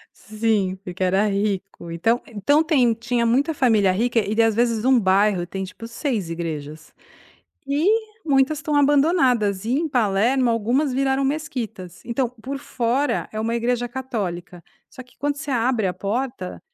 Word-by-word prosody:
Sim, 215 -4 -1
porque 185 0 -4
era 190 +3 +2
rico. 200 -3 -3
Então 225 +9 +1
então 240 +8 +2
tem 265 -8 +3
tinha 235 +1 -1
muita 275 +7 +2
família 220 -9 +3
rica 230 +5 +1
e 210 0 -2
daí 230 0 +4
às 225 -2 +1
vezes 230 -1 +1
1 260 -1 +5
bairro 190 -2 +2
tem 190 +2 -5
tipo 230 +4 -9
6 230 - -3
igrejas 160 -2 -6 0.7
e 285 +3 0 0.4
muitas 280 0 +2
estão 300 0 -3
abandonadas. 275 - +3
E 230 - -1
em 315 +5 0
Palermo, 240 +1 +2
algumas 240 +6 +1
viraram 270 +1 +1
mesquitas. 235 - -4
Então, 240 +1 -1
por 250 +4 -7
fora 265 +1 -1
é 215 - -5
uma 230 +1 -1
igreja 245 +1 0
católica, 195 -9 -5 0.3
só 255 - -10
que 250 - -25
quando 285 0 -1
você 290 0 -6
abre 240 -3 +1
a 180 - -2
porta, 210 +1 -4
230 Hz, 160 wpm, -22 LUFS, 200-265 Hz, 0.7 s, 1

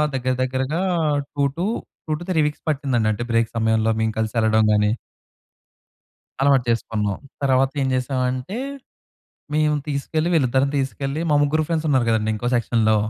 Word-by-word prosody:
దగ్గర, 130 0 0
దగ్గరగా 130 +6 -1 0.5
two 145 - +1
to 175 - 0 0.4
2-3 165 +3 -1
weeks 150 - -6
పట్టిందండి. 135 -6 0
అంటే, 110 +3 -3
బ్రేక్ 115 -1 +2
సమయంలో 110 0 +2
మేము 110 0 +1
కలిసెళ్ళడం 110 0 +2
గాని 105 0 +3 1.5
అలవాటు 135 -2 +4
చేసుకున్నాం. 105 -3 -1 0.2
తర్వాత 135 -1 +3
ఏం 135 - +1
చేసామంటే, 130 - -1 1.0
మేము 150 0 +3
తీసుకెళ్ళి 155 +3 -1
వీళ్ళిద్దరిని 135 -2 +2
తీసుకెళ్ళి 135 +2 -2
మా - - +4
ముగ్గురు 155 +2 +1
ఫ్రెండ్స్ 160 -2 -1
ఉన్నారు 130 -5 +2
కదండీ, 110 -1 +1
ఇంకో 120 +3 -2
సెక్షన్‌లో 110 -2 +2
130 Hz, 135 wpm, -22 LUFS, 115-145 Hz, 1.5 s, అలవాటు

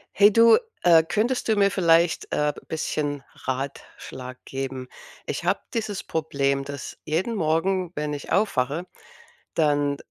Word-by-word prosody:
Hey, 205 +1 +6
du, 230 +1 +7 0.3
äh, 165 -2 +7
könntest 230 +9 0
du 220 - +3
mir 200 -1 +3
vielleicht, 170 -2 +3
äh, 150 0 +2 0.2
bisschen 145 -3 -2 0.2
Ratschlag 130 -1 -6
geben? 135 -1 -5 0.4
Ich - - -4
habe - - +2
dieses 215 -4 -3
Problem, 140 -3 -1
dass 140 -1 -7
jeden 180 +9 -1
Morgen, 180 +1 0
wenn 150 0 -2
ich 145 - -7
aufwache, 160 -5 +1 0.7
dann 145 -2 +2
155 Hz, 130 wpm, -24 LUFS, 140-195 Hz, 0.7 s, du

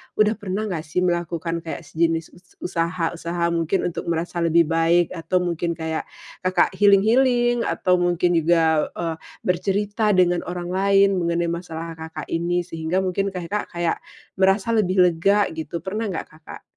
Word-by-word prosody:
udah 215 0 +4
pernah 205 +1 -3
gak 160 -3 -2
sih 180 +4 0
melakukan 170 -1 -1
kayak 165 0 -7
sejenis 165 +1 -1
us 180 +1 -21
usaha-usaha 170 0 -1
mungkin 170 +3 0
untuk - - -6
merasa 170 +1 -2
lebih 170 0 +4
baik 165 +2 +2
atau 180 +1 -1
mungkin 170 -1 -2
kayak 160 -1 -4 0.3
Kakak 185 -1 +2
healing-healing 240 +4 +3
atau 180 -1 +1
mungkin 175 0 +2
juga, 165 -1 +3
eee, 165 -2 -2 0.3
bercerita 205 +3 0
dengan 175 -1 +3
orang 175 0 -4
lain 195 0 +3
mengenai 170 0 0
masalah 165 -1 -5
Kakak 160 0 -7
ini 175 +1 0
sehingga 165 +2 -2
mungkin 190 +2 -1
Kakak 190 +2 -4 0.7
merasa 195 +3 +3
lebih 190 -4 +3
lega 195 +4 +2
gitu, 160 +1 -6
pernah 215 +3 -3
nggak 185 - -4
Kakak? 155 0 -12
175 Hz, 145 wpm, -22 LUFS, 165-190 Hz, 0.7 s, udah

